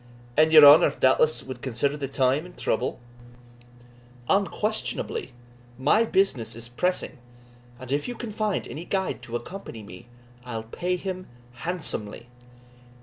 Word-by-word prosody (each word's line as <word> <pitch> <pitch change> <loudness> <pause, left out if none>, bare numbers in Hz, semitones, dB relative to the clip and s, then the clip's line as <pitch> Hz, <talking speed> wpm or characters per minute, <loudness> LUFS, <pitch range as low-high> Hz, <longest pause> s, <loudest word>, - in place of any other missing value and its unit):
"And 155 +1 +4
your 155 -2 +10
honour, 145 +2 +9
doubtless, 140 +3 +2
wad 130 -2 -8
consider 140 +3 -1
the 140 -2 -4
time 135 +2 +1
and 180 0 -13
trouble?" - - -1 1.3
"Unquestionably 205 -6 -1 0.5
my 150 - +3
business 140 - 0
is 115 0 -7
pressing, 180 +5 -2 0.6
and 130 0 -8
if 145 +1 0
you 245 - -5
can 235 -2 -6
find 210 -1 -2
any 160 - -7
guide 190 0 -2
to 120 - -7
accompany 120 - -7
me, 105 +4 -12 0.4
I'll 115 -3 -5
pay 180 +11 -2
him 185 0 -5 0.3
handsomely." 135 - -4
145 Hz, 135 wpm, -25 LUFS, 125-185 Hz, 1.3 s, your